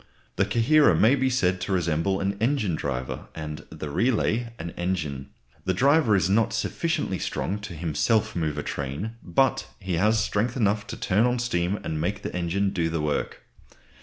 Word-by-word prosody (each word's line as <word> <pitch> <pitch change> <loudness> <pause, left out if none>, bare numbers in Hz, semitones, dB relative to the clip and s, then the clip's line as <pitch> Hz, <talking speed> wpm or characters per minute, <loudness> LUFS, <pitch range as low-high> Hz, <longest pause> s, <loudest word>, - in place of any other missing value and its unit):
The 95 - +2
coherer 120 +9 +4
may 115 +5 +5
be 130 -1 +2
said 95 -8 +1
to 100 - -3
resemble 90 +1 +1
an 100 +1 0
engine 115 - +1
driver, 65 -4 -3
and 75 -1 -5
the 75 -2 -6
"relay" 115 - +1
an 85 -3 -6
engine. 80 -8 -3 0.4
The 95 - +1
driver 140 - +4
is 90 -3 +2
not 110 +3 +2
sufficiently 150 - -1
strong 100 +3 -2
to 105 -4 -8
himself 100 +8 +1
move 80 -4 -1
a - - -2
train, 70 +10 -4
but 135 +10 +1
he 95 -3 -2
has 105 +5 +3
strength 110 +4 0
enough 105 -2 +1
to - - -6
turn 105 +5 +2
on 125 0 +1
steam 100 -5 0
and 80 -1 -3
make 100 +5 -2
the - - -5
engine 90 +3 0
do 85 -4 0
the 80 0 -2
work. 75 -1 -2
95 Hz, 180 wpm, -26 LUFS, 85-115 Hz, 0.4 s, may